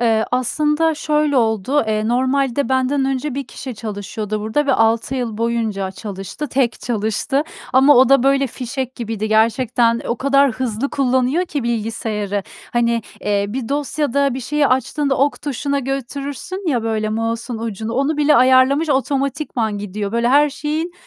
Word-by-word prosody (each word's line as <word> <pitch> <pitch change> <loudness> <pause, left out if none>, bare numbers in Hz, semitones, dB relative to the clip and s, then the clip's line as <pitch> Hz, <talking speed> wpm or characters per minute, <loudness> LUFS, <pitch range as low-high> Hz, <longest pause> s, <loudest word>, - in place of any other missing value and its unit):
Eee, 225 -2 +2
aslında 300 +6 +1
şöyle 300 -2 +1
oldu: 230 +4 +1
Eee, 215 0 0
normalde 260 +1 +1
benden 265 +1 +1
önce 270 +1 -2
1 275 0 -4
kişi 255 -3 -7
çalışıyordu 210 0 -5
burada 220 +8 0
ve 275 - +3
6 225 +2 +2
yıl 240 -5 -3
boyunca 225 -4 -1
çalıştı, 195 +8 -6
tek 255 -2 0
çalıştı. 220 +5 -1 0.3
Ama 270 +3 +6
o 255 +1 +6
da 275 -2 +5
böyle 275 +1 +3
fişek 255 +1 -5
gibiydi. 220 -2 -4
Gerçekten 230 +1 +2
o 235 - 0
kadar 275 +1 +3
hızlı 250 +2 -2
kullanıyor 260 +5 +1
ki 290 -6 -3
bilgisayarı, 215 -3 -2 0.3
hani, 235 -1 +1 0.2
ııı, 200 0 0
bir 245 -2 -4
dosyada 280 -1 0
bir 260 - -4
şeyi 295 +3 +1
açtığında 270 +2 0
ok 280 +1 +1
tuşuna 280 0 -1
götürürsün 275 +7 -4
ya 245 -6 +1
böyle 220 -1 -1
mouse'un 225 +2 -2
ucunu, 225 0 -4
onu 275 +5 0
bile 300 0 +4
ayarlamış 260 +5 +4
otomatikman 270 -5 -1
gidiyor. 205 +1 -4
Böyle 235 +1 +1
her 290 +3 +4
şeyin, 310 +4 -3
255 Hz, 155 wpm, -19 LUFS, 225-280 Hz, 0.3 s, Ama